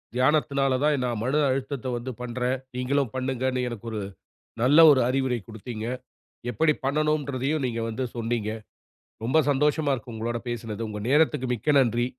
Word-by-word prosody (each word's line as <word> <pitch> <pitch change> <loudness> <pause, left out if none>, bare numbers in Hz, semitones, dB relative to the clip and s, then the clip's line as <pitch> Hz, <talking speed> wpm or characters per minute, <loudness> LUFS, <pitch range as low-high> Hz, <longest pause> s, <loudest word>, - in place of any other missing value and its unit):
தியானத்துனால 135 0 +2
தான் 150 -3 +2
நான் 120 -3 -2
மன 135 +5 +1
அழுத்தத்தை 130 -1 -2
வந்து 125 +2 -5
பண்றேன், 125 +1 -1 0.2
நீங்களும் 125 -1 0
பண்ணுங்கண்ணு 130 0 -1
எனக்கு 115 -1 -8
ஒரு 110 -1 -3 0.6
நல்ல 140 +6 +5
ஒரு 135 -3 +4
அறிவுரை 130 -2 0
குடுத்தீங்க. 110 +1 -7 0.6
எப்படி 150 +7 +3
பண்ணனும்ன்றதையும் 145 -1 0
நீங்க 115 -2 -3
வந்து 115 +3 -3
சொன்னீங்க. 115 -2 -1 0.7
ரொம்ப 130 +7 +2
சந்தோஷமா 150 +1 +2
இருக்கு, 120 -2 -6
உங்களோட 115 +2 -2
பேசுனது. 115 -2 -4
உங்க 105 -1 -5
நேரத்துக்கு 150 -3 +3
மிக்க 125 +6 0
நன்றி. 120 -2 +2
130 Hz, 145 wpm, -26 LUFS, 120-140 Hz, 0.7 s, நல்ல